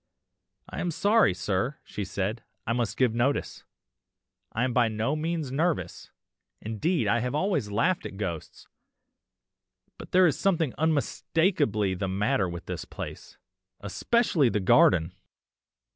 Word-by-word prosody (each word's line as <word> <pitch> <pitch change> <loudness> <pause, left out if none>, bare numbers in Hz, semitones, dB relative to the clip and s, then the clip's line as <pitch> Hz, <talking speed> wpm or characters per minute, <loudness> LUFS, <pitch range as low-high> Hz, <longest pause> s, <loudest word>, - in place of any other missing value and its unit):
"'I - - -6
am 175 - -1
sorry, 205 - +3
sir,' 95 +9 -1
she 105 - -5
said, 100 +4 -3 0.2
'I 115 - 0
must 120 -3 -1
give 125 -4 +3
notice. 125 +5 -1 0.9
I 115 - -1
am 130 -1 0
by 120 -2 +4
no 110 +6 -1
means 160 -3 -2
nervous, 160 +4 -1 0.5
indeed 115 - -1
I 120 +3 +3
have 125 +3 -2
always 180 - 0
laughed 115 - 0
at 95 - -11
ghosts, 85 -6 -6 1.3
but - - -10
there 185 0 +6
is 155 -6 +1
something 170 -8 +1
unmistakably 145 - +1
the 95 +1 -3
matter 100 +2 0
with 85 0 -7
this - - -5
place, - - -9 0.5
especially 160 - +2
the 105 - 0
garden! 95 -5 +4
120 Hz, 135 wpm, -27 LUFS, 105-160 Hz, 1.3 s, there